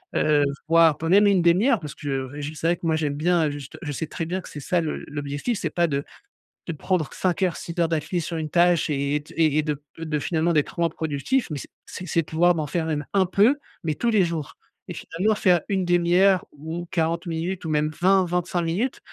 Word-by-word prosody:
heu, 150 -1 +3 0.2
voire, 165 -2 +5
pour 165 +1 -2
même 200 +3 +6
une 200 -3 +4
demi-heure», 195 +9 +4
parce 150 -3 -8
que 135 -3 -3
j 145 +1 -5
c'est 160 +2 -2
vrai 170 - +3
que 170 - -9
moi, 160 -1 +2
j'aime 150 -3 -1
bien 165 0 +2
juste 145 -1 -8
je 150 - -4
sais 155 +3 -3
très 165 - -4
bien 180 +3 -2
que - - -12
c'est 150 - -8
ça 170 +5 0
le 155 - -4
l'objectif, 145 +9 -3
c'est 160 - -2
pas 170 -1 +2
de 140 -1 -1 0.6
de 165 - -2
prendre 165 0 -1
5 185 +1 0
heures, 180 -2 +1
6 170 - -7
heures 170 - +3
d’affilée 160 +2 -1
sur 165 0 -4
une 155 -1 -3
tâche, 175 0 +3
et 140 0 0
et 150 - -5
t - - -15
et 155 -2 +3
et - - +4
de 150 -2 -3 0.2
de 155 -2 -2
finalement, 165 +2 0
d'être 150 0 0
moins 170 -1 +3
productif, 160 - -1
mais 145 - -3
c'est - - -9 0.2
c'est 185 - -8
c'est 165 +2 +2
de - - -22
pouvoir 175 +3 +3
m'en 155 -2 -2
faire 160 +2 -2 0.3
un 195 -2 +4
peu, 215 +10 +4 0.3
mais 155 - 0
tous 235 +10 -1
les 210 -5 +4
jours, 165 -4 -5 0.3
et - - -6
finalement 205 +6 -1
faire 180 -5 +3
une 190 -2 0
1/2 175 +2 +3
ou 160 +4 -6
40 170 +1 -1
minutes 170 +2 -3
ou 160 - -3
même 150 0 +1
20-25 180 -2 +2
minutes 195 +11 -1
165 Hz, 235 wpm, -24 LUFS, 150-180 Hz, 0.6 s, même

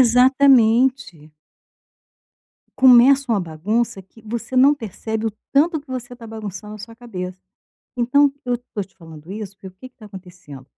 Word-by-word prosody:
Exatamente. 250 - +3 1.5
Começa 260 +1 +6
uma 215 -3 +2
bagunça 195 +6 -2
que 205 +4 -21
você 235 +3 -5
não 275 +3 +6
percebe 220 -2 -5
o - - 0 0.2
tanto 315 +3 +2
que 285 - -25
você 250 -2 -7
está 235 -2 -12
bagunçando 210 -2 -8
a - - -10
sua 225 +2 -11
cabeça. 185 -7 -7 0.6
Então, 275 +4 +3
eu 245 -1 0
estou 240 -4 -7
te 190 - -24
falando 160 0 -13
isso, 205 -1 -7
porque 195 - -12
o - - -11
que 190 +8 -13
que 255 - -47
está 220 - -15
acontecendo, 180 -9 -13
225 Hz, 160 wpm, -20 LUFS, 190-255 Hz, 1.5 s, Começa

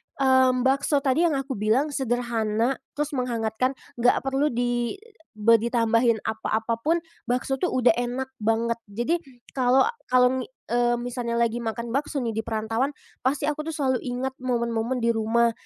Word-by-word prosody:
mmm 260 -2 +4
bakso 275 +2 +2
tadi 305 +6 +3
yang 300 - 0
aku 270 -5 -3
bilang 250 +8 +2
sederhana, 240 -2 0 0.2
terus 295 +1 -2
menghangatkan, 250 0 -1 0.2
nggak 245 +2 +3
perlu 270 +2 +1
di 240 +2 -1 0.4
be 225 +1 +5
ditambahin 230 -1 +2
apa-apapun, 230 +10 -1 0.2
bakso 255 +2 -1
tuh 360 - +1
udah 250 -5 +4
enak 255 +2 -3
banget. 230 +2 0
Jadi 240 +12 -1 0.3
kalau, 255 0 +4 0.2
kalau 250 +1 +4
ngi 250 - -5 0.2
eee 240 0 +1
misalnya 240 -1 -3
lagi 235 0 +1
makan 230 +1 -4
bakso 290 +1 -1
nih 230 - -1
di 220 - -2
perantauan, 225 +5 -2 0.3
pasti 270 +3 0
aku 300 +1 -2
tuh 320 - -3
selalu 260 -4 +1
ingat 255 +1 -3
momen-momen 235 -1 -1
di 235 - +4
rumah 230 +1 +2
245 Hz, 155 wpm, -25 LUFS, 230-265 Hz, 0.4 s, be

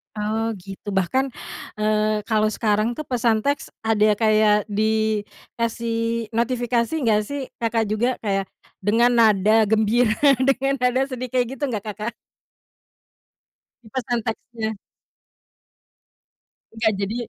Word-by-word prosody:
Oh 220 +1 -1
gitu, 195 +1 -10
bahkan, 260 +9 +1 0.5
eee, 215 0 +1
kalau 215 -1 +1
sekarang 215 +2 0
tuh 305 - -5
pesan 230 -4 +1
teks 285 0 -1 0.2
ada 215 -1 +3
kayak 215 -1 +3
di 215 0 +1 0.4
kasih 230 -1 -1
notifikasi 235 +2 0
nggak 215 -2 +3
sih, 285 -1 -4 0.2
Kakak 230 -1 +1
juga, 240 +4 +1
kayak 195 -2 0 0.3
dengan 230 +5 +3
nada 215 -1 +4
gembira, 220 +1 +2 0.2
dengan 270 +1 +2
nada 250 +1 +2
sedih 255 0 -4
kayak 250 -1 +1
gitu - - -6
nggak 215 -4 -3
Kakak? 215 +3 -5 1.8
Pesan 240 -2 -1
teksnya. 225 -1 -4 2.0
Enggak 220 -1 +1
jadi 200 +3 -2
225 Hz, 115 wpm, -22 LUFS, 215-240 Hz, 2.0 s, nada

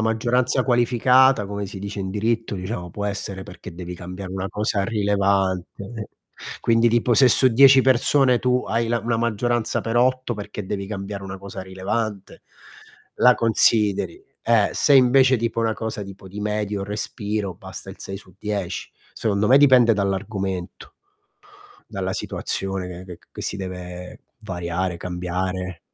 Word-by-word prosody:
maggioranza 120 +3 +1
qualificata, 125 0 +4
come 100 0 -5
si 95 0 -8
dice 100 +1 -6
in 95 -1 -3
diritto 110 +2 -1
diciamo, 90 -1 -5
può 100 +4 -5
essere 100 -1 -4
perché 85 - -11
devi 90 0 -7
cambiare 90 +1 -8
una 95 0 -3
cosa 105 +1 -1
rilevante, 100 -3 0
eh 105 -1 -6 0.5
Quindi, 115 0 +3
tipo: 120 +1 +2
se 130 - +6
su 130 +2 +7
10 135 +2 +7
persone 130 0 +3
tu 125 0 +1
hai 115 +1 0
la 120 +1 0
una 115 +1 -1
maggioranza 120 0 0
per 115 +1 -3
8, 130 0 +1
perché 105 -1 -7
devi 100 0 -4
cambiare 100 -1 -6
una 95 0 -6
cosa 95 0 -8
rilevante, 100 +2 -4 0.7
la 125 - +6
consideri, 115 - +3 0.2
eh, 115 -3 +3
se 145 - +3
invece 130 0 +5
tipo 115 -1 -2
una 115 -1 +1
cosa 110 -1 -4
tipo 95 -1 -12
di 100 - -8
medio 105 -1 -2
respiro 105 -1 -3
basta 95 +1 -8
il 95 - -10
6 95 - -6
su 95 -2 -13
10. 105 -4 -4 0.2
Secondo 105 -1 0
me 135 - +8
dipende 130 -5 +6
dall'argomento, 95 -2 -3 0.9
dalla 95 -3 -4
situazione 95 -1 -3
che 90 +1 -9
che 90 -2 -10
ch - - -29
che - - -8
si - - -2
deve 90 -2 -7 0.2
variare, 90 0 -3
cambiare. 90 0 -4
105 Hz, 155 wpm, -22 LUFS, 95-115 Hz, 0.9 s, me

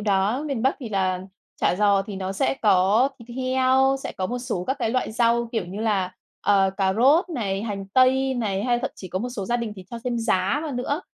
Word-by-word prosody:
đó. 205 +5 +1
Miền 270 -6 -2
Bắc 265 - +2
thì 240 - -5
là 190 -3 0 0.4
chả - - +3
giò 200 -2 +4
thì 200 0 -7
nó 190 0 -3
sẽ 195 - 0
có 210 +1 +3 0.2
thịt 240 +1 -10
heo, 260 +1 +2
sẽ - - -5
có 185 - -3
một 245 +5 -3
số 240 -8 -3
các 265 - 0
cái 220 - 0
loại 255 -2 -1
rau, 235 0 +2
kiểu, 225 -5 -1
như 195 +4 -6
là, 195 -5 0 0.3
ờ, 195 -1 +3
cà 190 -2 +2
rốt 285 - +4
này, 210 - -2
hành 200 -3 -4
tây 265 +1 +4
này, 205 -5 -1
hay 240 -1 +2
thậm 265 - -3
chí 185 - -9
có 185 - -2
một 245 - -3
số 230 -5 -5
gia 240 +5 0
đình 230 -3 -4
thì 190 - -10
cho 235 - -5
thêm 245 -2 -1
giá 230 +5 +1
vào 305 - -4
nữa, 270 +5 -2
230 Hz, 240 wpm, -24 LUFS, 195-255 Hz, 0.4 s, giò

